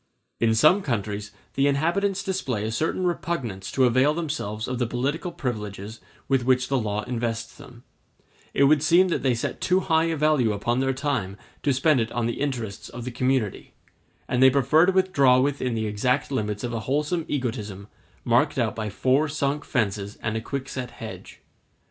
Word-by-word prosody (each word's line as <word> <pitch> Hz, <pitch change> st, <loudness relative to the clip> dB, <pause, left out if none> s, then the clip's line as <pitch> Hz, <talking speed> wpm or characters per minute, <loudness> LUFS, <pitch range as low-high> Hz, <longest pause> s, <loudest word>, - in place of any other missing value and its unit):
In 110 Hz, -1 st, +3 dB
some 155 Hz, -, +5 dB
countries 105 Hz, -, -3 dB, 0.2 s
the 140 Hz, +1 st, +2 dB
inhabitants 185 Hz, +8 st, +1 dB
display 135 Hz, -, -2 dB
a 110 Hz, -, -2 dB
certain 160 Hz, +9 st, -1 dB
repugnance 135 Hz, -, -3 dB
to 130 Hz, -, +4 dB
avail 130 Hz, +5 st, +3 dB
themselves 130 Hz, -10 st, -3 dB
of 125 Hz, -1 st, -3 dB
the 120 Hz, -, +1 dB
political 140 Hz, +9 st, -2 dB
privileges 105 Hz, -, -5 dB, 0.3 s
with 135 Hz, -2 st, +2 dB
which 125 Hz, 0 st, +2 dB
the 135 Hz, -1 st, +2 dB
law 105 Hz, -1 st, -2 dB
invests 115 Hz, -1 st, -3 dB
them; 120 Hz, -1 st, -14 dB, 0.7 s
it -, -, +2 dB
would 145 Hz, +1 st, +5 dB
seem 175 Hz, +4 st, +4 dB
that -, -, 0 dB
they 130 Hz, -3 st, +2 dB
set 115 Hz, -, -4 dB
too 185 Hz, +1 st, +3 dB
high 160 Hz, -2 st, +2 dB
a 165 Hz, -1 st, 0 dB
value 145 Hz, -7 st, +2 dB
upon 120 Hz, +5 st, -1 dB
their 135 Hz, 0 st, +1 dB
time 130 Hz, -8 st, -2 dB, 0.2 s
to 145 Hz, -, +1 dB
spend 140 Hz, +2 st, +3 dB
it 115 Hz, -1 st, -1 dB
on 120 Hz, -1 st, -1 dB
the 120 Hz, +3 st, -3 dB
interests 120 Hz, -8 st, -3 dB
of 120 Hz, 0 st, -8 dB
the 125 Hz, -, -4 dB
community; 125 Hz, -4 st, -1 dB, 0.5 s
and 125 Hz, 0 st, 0 dB
they 130 Hz, -, +9 dB
prefer 140 Hz, +5 st, +4 dB
to -, -, +4 dB
withdraw 145 Hz, -10 st, +4 dB
within 130 Hz, -3 st, 0 dB
the 110 Hz, -1 st, -1 dB
exact 125 Hz, +8 st, 0 dB
limits 105 Hz, -5 st, -2 dB
of 120 Hz, -1 st, -3 dB
a 115 Hz, -, -1 dB
wholesome 150 Hz, +4 st, 0 dB
egotism, 110 Hz, -7 st, -4 dB, 0.4 s
marked -, -, +2 dB
out -, -, 0 dB
by 110 Hz, -1 st, -3 dB
four 130 Hz, +8 st, +1 dB
sunk 145 Hz, 0 st, -1 dB
fences 105 Hz, -4 st, -1 dB
and 110 Hz, 0 st, -1 dB
a 110 Hz, -, -1 dB
quickset 130 Hz, 0 st, -5 dB
hedge. 115 Hz, -2 st, -10 dB
130 Hz, 185 wpm, -25 LUFS, 110-145 Hz, 0.7 s, they